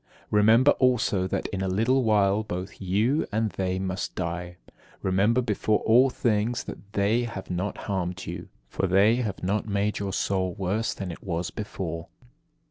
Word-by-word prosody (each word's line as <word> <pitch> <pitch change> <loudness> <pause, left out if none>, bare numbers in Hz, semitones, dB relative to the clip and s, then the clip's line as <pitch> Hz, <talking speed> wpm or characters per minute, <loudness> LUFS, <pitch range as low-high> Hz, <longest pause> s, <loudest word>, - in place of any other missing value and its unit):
Remember 110 +6 +6
also 120 -7 +2
that - - -2
in 95 - -3
a 95 - 0
little 115 +8 +2
while 105 -2 +3
both 90 -3 -6
you 105 - +1
and 110 0 0
they 95 -1 -2
must 95 0 -3
die: 90 0 -4 0.5
remember 105 +6 +3
before 110 -1 +1
all 125 +4 +5
things 115 0 0
that 100 +1 -10
they 110 +4 +2
have 100 -6 -7
not 90 +2 -2
harmed 95 -1 -3
you, - - -6 0.2
for 95 - -1
they 100 +5 +4
have 105 -8 -3
not 100 +4 0
made 100 0 0
your 100 -1 -2
soul 95 -2 -1
worse 100 +4 -1
than 95 -3 -5
it - - -10
was 85 -2 -3
before. 85 -5 -5
100 Hz, 165 wpm, -26 LUFS, 95-110 Hz, 0.5 s, Remember